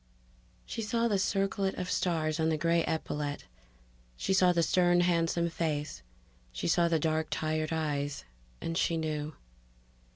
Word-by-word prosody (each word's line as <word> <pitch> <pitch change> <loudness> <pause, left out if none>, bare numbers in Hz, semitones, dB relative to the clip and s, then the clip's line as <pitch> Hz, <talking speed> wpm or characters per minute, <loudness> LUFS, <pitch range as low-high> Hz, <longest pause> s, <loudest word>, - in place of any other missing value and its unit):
She 225 - -4
saw 230 +2 +1
the 205 -4 +1
circlet 195 0 0
of 180 - -4
stars 160 -3 0
on 160 0 +2
the 160 - +1
gray 165 +1 +2
epaulet; 150 -2 -3 0.7
she 190 - 0
saw 185 -1 +5
the 170 -1 +2
stern 175 0 +3
handsome 170 -1 +2
face; 155 - -2 0.5
she - - -3
saw 170 +1 +3
the 165 -1 +2
dark 155 0 0
tired 155 0 -1
eyes. 145 - -2 0.4
And 165 - -3
she 165 0 +1
knew. 155 -2 -3
165 Hz, 150 wpm, -30 LUFS, 155-175 Hz, 0.7 s, saw